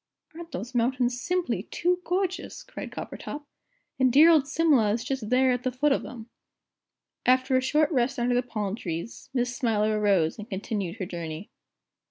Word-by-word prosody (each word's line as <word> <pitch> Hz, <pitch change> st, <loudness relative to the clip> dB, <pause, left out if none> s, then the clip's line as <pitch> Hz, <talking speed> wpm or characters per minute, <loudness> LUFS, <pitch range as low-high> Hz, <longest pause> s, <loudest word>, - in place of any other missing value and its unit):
"Aren't 335 Hz, +1 st, -10 dB
those 240 Hz, +7 st, -6 dB
mountains 245 Hz, 0 st, +1 dB
simply 360 Hz, 0 st, -1 dB
too 355 Hz, +1 st, 0 dB
gorgeous!" 370 Hz, 0 st, -2 dB
cried -, -, -8 dB
Coppertop; 295 Hz, 0 st, -7 dB, 0.5 s
"and 260 Hz, -1 st, +4 dB
dear 305 Hz, +6 st, +8 dB
old 300 Hz, -4 st, +4 dB
Simla 285 Hz, -9 st, +3 dB
is 230 Hz, -, -2 dB
just 260 Hz, -6 st, -3 dB
there 255 Hz, +1 st, +4 dB
at 250 Hz, -1 st, 0 dB
the 255 Hz, -, -1 dB
foot 285 Hz, +4 st, +1 dB
of 275 Hz, -, +2 dB
them." 235 Hz, -3 st, -9 dB, 1.0 s
After 255 Hz, +1 st, +3 dB
a 255 Hz, -, +4 dB
short 300 Hz, +4 st, +2 dB
rest 265 Hz, -1 st, +1 dB
under 245 Hz, 0 st, +1 dB
the 245 Hz, -, +3 dB
palm 215 Hz, -5 st, -3 dB
trees, 170 Hz, 0 st, -6 dB
Miss 250 Hz, -1 st, -1 dB
Smiler 215 Hz, -4 st, +1 dB
arose 195 Hz, -4 st, +2 dB
and 210 Hz, +3 st, -8 dB
continued 195 Hz, -2 st, -3 dB
her 205 Hz, -5 st, -4 dB
journey. 170 Hz, 0 st, -6 dB
250 Hz, 175 wpm, -27 LUFS, 215-285 Hz, 1.0 s, dear